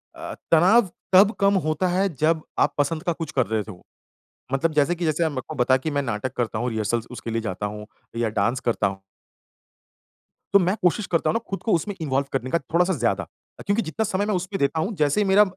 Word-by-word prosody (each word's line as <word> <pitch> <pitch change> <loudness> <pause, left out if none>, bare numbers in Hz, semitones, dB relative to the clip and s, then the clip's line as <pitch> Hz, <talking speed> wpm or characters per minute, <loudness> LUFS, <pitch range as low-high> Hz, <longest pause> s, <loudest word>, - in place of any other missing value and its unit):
अ, - - -7 0.2
तनाव 185 +6 +5 0.2
तब 200 +3 +7
कम 200 0 +4
होता 155 +4 +1
है 190 +3 +2
जब 155 +3 +2 0.2
आप - - +3
पसंद 155 +2 0
का 170 - 0
कुछ 165 0 -6
कर 130 -3 +1
रहे 110 0 0
हो - - -2
तो। 95 -5 -11 0.7
मतलब 155 +4 +1
जैसे 150 +4 +2
कि 170 - -3
जैसे 160 +1 +1
मेरे 130 -3 -4
को 155 - -6
बता 130 0 +3
कि 150 +4 -4
मैं 145 0 0
नाटक 120 0 -3
करता 110 -3 -1
हूँ, 125 - -1
रिहर्सल 110 +1 -1
उसके 120 -1 -7
लिए 115 0 -1
जाता 105 -2 -4
हूँ 105 +1 -6 0.3
या 115 -2 +1
डांस 110 +4 0
करता 120 -4 0
हूँ। 95 0 -6 1.5
तो 200 - +8
मैं 185 +2 +1
कोशिश 180 +3 +2
करता 170 - +1
हूँ - - +1
ना - - +2
खुद 195 - -4
को 225 - +1
उसमें 190 +4 0
इन्वॉल्व 140 -2 0
करने 130 -1 -2
का 170 - +2
थोड़ा-सा 175 +7 +1
ज़्यादा। 115 - -1 0.4
क्योंकि 205 +3 +2
जितना 190 +8 -2
समय 200 -1 -1
मैं 210 - 0
उसपे 185 +2 -3
देता 140 +3 0
हूँ 200 +7 -1
जैसे 150 +6 +2
ही - - +2
मेरा 200 +2 +6
155 Hz, 230 wpm, -24 LUFS, 120-185 Hz, 1.5 s, तो